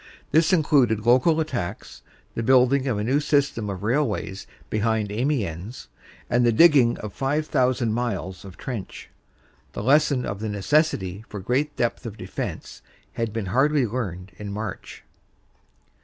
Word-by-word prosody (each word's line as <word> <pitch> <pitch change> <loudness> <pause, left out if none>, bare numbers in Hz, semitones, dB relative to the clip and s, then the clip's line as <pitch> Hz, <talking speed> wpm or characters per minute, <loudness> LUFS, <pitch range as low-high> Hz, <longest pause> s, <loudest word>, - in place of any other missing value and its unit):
This 160 +2 +4
included 135 - +3
local 130 +7 +4
attacks, 120 - -4 0.3
the - - -3
building 130 +3 +4
of 120 -5 0
a 105 - -1
new 130 +6 +2
system 140 -7 0
of 95 -1 -5
railways 115 -5 -1 0.2
behind 110 -1 0
Amiens, 110 - -3 0.4
and 120 0 +2
the 120 - +4
digging 135 -2 +5
of 105 -2 -7
five 145 +3 -1
thousand 125 -5 +1
miles 100 -6 -3
of 95 -2 -11
trench. 120 -7 -7 0.6
The - - -5
lesson 140 0 +3
of 100 - -4
the 110 0 -3
necessity 105 - 0
for 105 - -6
great 135 +9 -1
depth 120 0 -1
of 110 -1 -8
defense - - -6 0.3
had 115 -2 -2
been 110 -1 -3
hardly 140 +1 +3
learned 100 -6 -4
in 105 -1 -6
March. 105 -1 -6
120 Hz, 145 wpm, -24 LUFS, 105-140 Hz, 0.6 s, digging